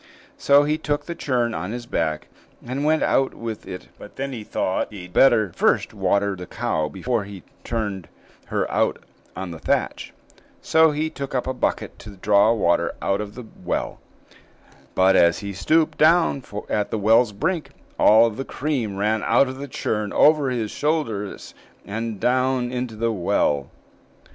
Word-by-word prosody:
So 140 +1 +5
he 150 +1 0
took 145 -2 -2
the 170 - -4
churn 125 -7 -1
on 95 -2 -4
his 120 0 -5
back, 80 -8 -2 0.4
and 130 +4 -3
went 155 +1 +2
out 135 0 +1
with 115 -2 -6
it; 90 -1 -8
but 105 - -12
then 135 0 -4
he 115 -3 -6
thought 95 -1 -2
he'd 90 -4 -10
better 115 -8 +4
first - - +1
water 100 -1 +1
the 90 0 -9
cow 80 -1 -2
before 115 +7 -2
he 100 -2 -10 0.2
turned 105 -7 -3 0.4
her - - -1
out - - +1 0.4
on 95 -1 -5
the 80 - -8
thatch; - - -1 0.5
so 160 0 +4
he 155 +1 -2
took 140 -3 -6
up 125 - 0
a 130 - -2
bucket 125 - -2
to 105 -1 -11
draw 100 +3 +4
water 100 -7 +1
out 100 +1 0
of 105 0 -7
the 125 -1 -8 0.2
well; - - -3 1.0
but, 95 +1 +4
as 85 -1 +5
he 100 - -4
stooped 155 - +1
down 160 -3 +4 0.2
at 105 -1 -1
the - - -2
well's 110 +2 +4
brink, 160 - -2 0.3
all 110 +2 +6
the 130 +6 -5
cream 130 -9 -3
ran 105 +2 +1
out 140 - +3
of 130 0 -6
the 140 +1 -6
churn 105 -5 -2
over 150 -3 +4
his 115 -4 -2
shoulders, 145 -10 -2 0.3
and 115 +2 -4
so - - -12
down 125 +1 +1
into 125 -2 -4
the 115 +1 0
well. 75 - 0
115 Hz, 175 wpm, -23 LUFS, 100-135 Hz, 1.0 s, all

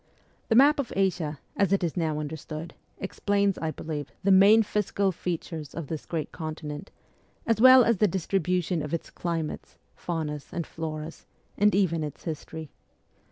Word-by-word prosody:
The 225 - +3
map 285 +4 +6
of 270 - -2
Asia, 175 -7 0 0.2
as 200 -2 +2
it 195 -2 +2
is 170 - -1
now 160 -4 0
understood, 155 +2 -6 0.2
explains, 200 0 0
I 160 - -1
believe, 150 -4 -5
the 195 - +4
main 200 +4 +7
physical 200 -1 0
features 165 -3 -5
of 165 - -4
the 160 -2 -4
great 160 -3 -3
continent, 155 +1 -6 0.6
as 225 -1 +1
well 260 0 +9
as 235 -2 +2
the 210 - +4
distri 190 +1 0
bution 180 -2 0
of 150 +2 -2
its 165 - -7
climates, 165 -3 -4 0.2
faunas, 155 -4 -4
and 170 -2 -3
floras, 160 0 -6 0.3
and 210 -1 +3
even 170 -5 +2
its 150 -2 -7
history. 160 -1 -6
170 Hz, 160 wpm, -27 LUFS, 155-195 Hz, 0.6 s, well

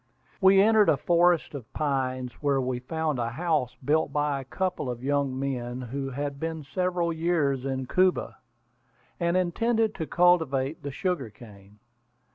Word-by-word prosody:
We 190 0 +6
entered 215 +1 +5
a - - +4
forest 175 -2 +2
of 130 -7 -8
pines, 130 -4 -1
where 140 -2 +2
we 125 -1 -2
found 155 +1 -2
a 115 -1 -1
house 145 -2 -1
built 150 0 +2
by 145 -1 0
a - - -11
couple 180 -3 -2
of 120 0 -5
young 140 -1 0
men 125 -2 -3
who 135 +2 -4
had 140 +1 -4
been 160 -1 -4
several 175 +3 -1
years 160 -6 0
in 130 -1 -2
Cuba, 185 +6 +1 0.8
and 170 +1 +1
intended 220 +5 +1
to 160 -4 -5
cultivate 160 -5 +2
the 140 - -5
sugar 140 - -2
cane. 105 -2 -16
145 Hz, 155 wpm, -27 LUFS, 130-175 Hz, 0.8 s, We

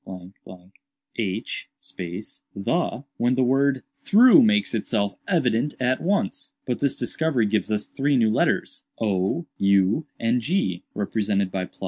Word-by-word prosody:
h 105 -2 -3 0.9
the, 125 - -1
when 120 +2 +2
the 130 - +2
word 135 +1 +2 0.2
'through' 245 +7 +7
makes 215 - +2
itself 105 -2 -1
evident 145 - +1
at 130 0 0
once. 195 +4 -1
But 125 - -2
this 140 -2 0
discovery 130 -1 0
gives 110 +1 0
us 105 -1 0
three 140 0 0
new 110 -3 +3
letters, - - 0 0.2
o, 100 - 0
u 100 +9 +2
and 115 +2 +1
g, 105 - -1
represented 100 -1 -1
by 90 -1 -3
‡,? - - -21
120 Hz, 130 wpm, -24 LUFS, 100-145 Hz, 0.9 s, through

